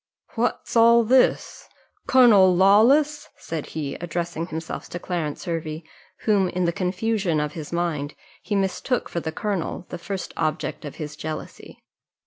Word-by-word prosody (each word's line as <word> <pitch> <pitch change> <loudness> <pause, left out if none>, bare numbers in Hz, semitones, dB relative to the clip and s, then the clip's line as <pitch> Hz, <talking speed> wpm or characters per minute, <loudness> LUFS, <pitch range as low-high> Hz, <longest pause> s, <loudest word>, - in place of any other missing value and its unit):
"What's 240 +1 -2
all 235 0 +6
this? 255 +3 +2 0.4
Colonel 205 -8 +6
Lawless!" 245 +11 +4
said 160 -3 -5
he, 150 -3 -4
addressing 170 -1 -3
himself 160 -1 -6
to 175 - -5
Clarence 170 -4 -4
Hervey, 160 -2 -4 0.4
whom, 200 -4 +2
in 180 0 -1
the 170 - +1
confusion 185 -1 0
of 150 0 -2
his 155 -3 -7
mind, 165 -4 -2 0.3
he 210 - -3
mistook 195 +5 -1
for 170 - -2
the 160 -1 -4
colonel, 195 -2 -3
the - - -6
first 195 +2 -5
object 155 0 -2
of 145 - -7
his 150 -2 -6
jealousy. 155 +1 -8
175 Hz, 145 wpm, -24 LUFS, 160-210 Hz, 0.4 s, all